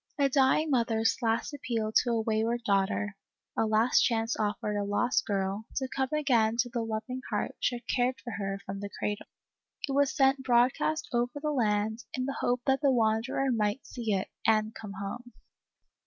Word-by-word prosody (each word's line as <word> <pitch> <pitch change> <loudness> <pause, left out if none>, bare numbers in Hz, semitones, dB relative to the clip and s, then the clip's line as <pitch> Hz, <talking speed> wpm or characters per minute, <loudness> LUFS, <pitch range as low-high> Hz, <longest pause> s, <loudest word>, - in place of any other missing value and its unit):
A 280 -1 +3
dying 275 +3 +3
mother's 230 -3 +2
last 230 +5 0
appeal 230 -6 -2
to 250 - +2
a 230 -1 +1
wayward 225 +2 0
daughter, 200 0 +1 0.4
a 225 - +1
last 220 +3 +4
chance 225 -1 +1
offered 210 0 -1
a 205 - 0
lost 205 +5 +1
girl, 195 +1 -1
to 265 - -1
come 265 -1 0
again 240 -7 +2
to 245 0 +1
the 235 - 0
loving 225 +3 -4
heart - - -1
which - - +1
had 240 0 -7
cared 250 -2 +1
for 220 +4 -7
her 195 0 -3
from 195 +1 -5
the 205 0 -5
cradle, 205 0 -3 0.6
it - - -3
was 280 0 +3
sent 270 0 +3
broadcast 260 +5 +2
over 245 +4 0
the 300 +1 -1
land, 220 -3 0
in 255 - -1
the 275 - -3
hope 245 0 +1
that 270 +1 +2
the 285 - +4
wanderer 240 +3 +1
might 215 +2 0
see 235 -3 -4
it, 190 -2 -1 0.2
and 215 0 +3
come 210 -3 -8
home. 200 +5 -6
230 Hz, 185 wpm, -29 LUFS, 215-260 Hz, 0.6 s, last